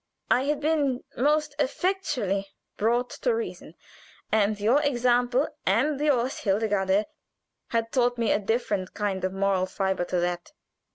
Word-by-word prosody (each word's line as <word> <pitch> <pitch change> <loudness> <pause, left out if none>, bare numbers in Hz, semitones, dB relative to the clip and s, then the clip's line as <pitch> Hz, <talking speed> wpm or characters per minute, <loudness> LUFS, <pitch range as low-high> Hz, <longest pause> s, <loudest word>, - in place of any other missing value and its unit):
I 255 +2 +3
had 295 0 0
been 290 -4 0
most 300 +3 +1
effectually 265 - -1 0.3
brought 240 +3 +1
to - - +2
reason, 460 0 -6 0.6
and 210 -1 +2
your 235 +8 +3
example, 250 0 +2 0.2
and 265 +9 +1
yours, 270 -4 +1
Hildegarde, 200 -1 +1 0.6
had 230 -1 -1
taught 245 -1 +2
me 230 -2 +1
a - - +3
different 205 -3 -1
kind 200 -3 -2
of 185 - 0
moral 195 -1 +1
fiber 190 -1 -1
to 180 0 -1
that. 175 +7 -3
235 Hz, 135 wpm, -26 LUFS, 195-280 Hz, 0.6 s, I